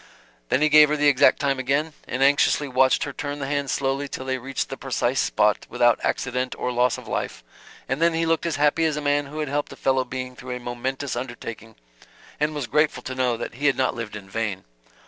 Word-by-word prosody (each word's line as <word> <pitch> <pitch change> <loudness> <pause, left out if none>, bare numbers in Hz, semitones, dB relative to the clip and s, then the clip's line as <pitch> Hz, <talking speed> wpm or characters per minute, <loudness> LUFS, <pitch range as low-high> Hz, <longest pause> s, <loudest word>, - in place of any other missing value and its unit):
Then 140 - +2
he 155 - +4
gave 150 0 +7
her 150 - +1
the 145 0 +3
exact 140 -2 +5
time 140 -2 0
again, 140 +5 0
and 130 +2 -1
anxiously 145 +1 +3
watched 130 0 +3
her - - -5
turn 145 0 -4
the 140 - -4
hands 140 -1 -1
slowly 135 +1 -1
till 130 - -6
they 130 0 -1
reached 135 +2 -3
the - - -4
precise - - -1
spot - - +1
without - - +3
accident 125 +1 -1
or 125 - -2
loss 125 0 +2
of - - -11
life, - - -3 0.4
and 135 +4 -2
then 170 0 +3
he 165 0 +1
looked 165 +1 +1
as 165 - -1
happy 150 +3 +2
as 155 -2 0
a - - 0
man 145 -1 +1
who 150 +2 -9
had 150 - -2
helped 145 +1 -2
a - - -8
fellow 130 -1 +1
being 130 0 -6
through 125 0 -6
a - - -6
momentous 130 +3 -4
undertaking, 115 -2 -7 0.6
and 150 +1 0
was 145 -3 -2
grateful 145 0 +1
to 130 - -5
know 125 -2 0
that - - -5
he 140 +5 -1
had 135 - +3
not 130 - +1
lived 115 -3 -6
in 100 -2 -9
vain. 100 -2 -3
135 Hz, 235 wpm, -24 LUFS, 125-145 Hz, 0.6 s, gave